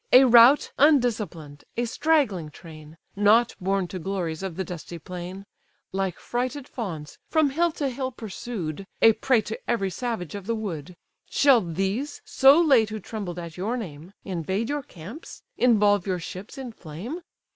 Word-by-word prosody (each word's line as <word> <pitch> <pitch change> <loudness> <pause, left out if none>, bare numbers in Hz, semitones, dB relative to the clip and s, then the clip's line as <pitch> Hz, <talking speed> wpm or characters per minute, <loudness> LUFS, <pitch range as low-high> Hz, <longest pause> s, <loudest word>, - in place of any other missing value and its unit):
A 255 +2 +9
rout 245 +3 +7
undisciplined, 215 - +2
a 240 - +1
straggling 235 - +1
train, 155 0 -13 0.2
Not 215 +4 +4
born 195 0 0
to 185 - -5
glories 175 -3 -3
of 190 -4 -4
the 190 - -2
dusty 175 -1 -7
plain; 180 +4 -8 0.5
Like 190 -2 -2
frighted 255 +3 -3
fawns 165 - -6
from 310 -3 +3
hill 340 +4 +2
to 285 - -2
hill 260 0 -3
pursued, 195 - -6 0.2
A 225 - +8
prey 245 0 +2
to 215 +1 -6
every 195 -5 0
savage 225 - -4
of 200 -1 -7
the 230 - 0
wood: 180 -6 -5 0.3
Shall 275 -5 +5
these, 195 - -2
so 275 +4 +6
late 265 -10 +4
who 215 0 -5
trembled 200 -4 -6
at 170 -1 -7
your 215 +7 -2
name, 175 -4 -8
Invade 190 +4 -2
your 290 0 -1
camps, 210 - -11
involve 210 -4 +3
your 185 -1 0
ships 185 - -8
in 260 -3 -6
flame? 195 - -7
205 Hz, 160 wpm, -25 LUFS, 180-245 Hz, 0.5 s, A